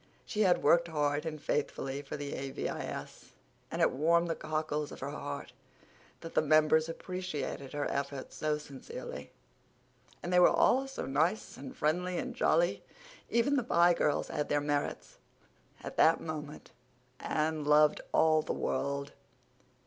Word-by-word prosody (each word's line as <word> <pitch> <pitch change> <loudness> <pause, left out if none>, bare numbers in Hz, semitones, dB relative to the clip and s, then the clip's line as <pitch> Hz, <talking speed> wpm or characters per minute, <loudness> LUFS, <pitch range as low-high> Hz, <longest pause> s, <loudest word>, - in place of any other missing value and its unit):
She 215 - -2
had 185 -4 +3
worked 170 0 +5
hard 150 -1 0
and 155 -1 -4
faithfully 140 -2 -2
for 145 +1 -6
the 145 -1 -5
A.V.I.S., 135 0 -5 0.4
and - - 0
it - - +4
warmed 170 +4 +2
the - - -1
cockles 155 -1 -2
of - - -9
her 140 +2 -4
heart 145 -3 -6 0.7
that 165 - -8
the - - +4
members 155 +1 +4
appreciated 165 -6 -5
her 145 0 -1
efforts 140 -1 -4
so 155 -1 0
sincerely. 140 -3 -8 0.9
And 180 - -2
they 180 - +6
were 180 - +8
all 270 +2 +3
so 270 - -5
nice 160 +10 0
and 265 - -9
friendly 180 +4 0
and 255 +4 -4
jolly—even - - 0
the 260 - +1
Pye 175 -6 +4
girls 150 -3 0
had 150 - -2
their 145 - +2
merits; 145 0 -3 0.6
at - - -7
that 165 - +5
moment 150 -2 -7 0.5
Anne 155 0 -1
loved 150 +1 +4
all 155 -1 +4
the - - -3
world. 140 0 -2
155 Hz, 150 wpm, -31 LUFS, 145-175 Hz, 0.9 s, were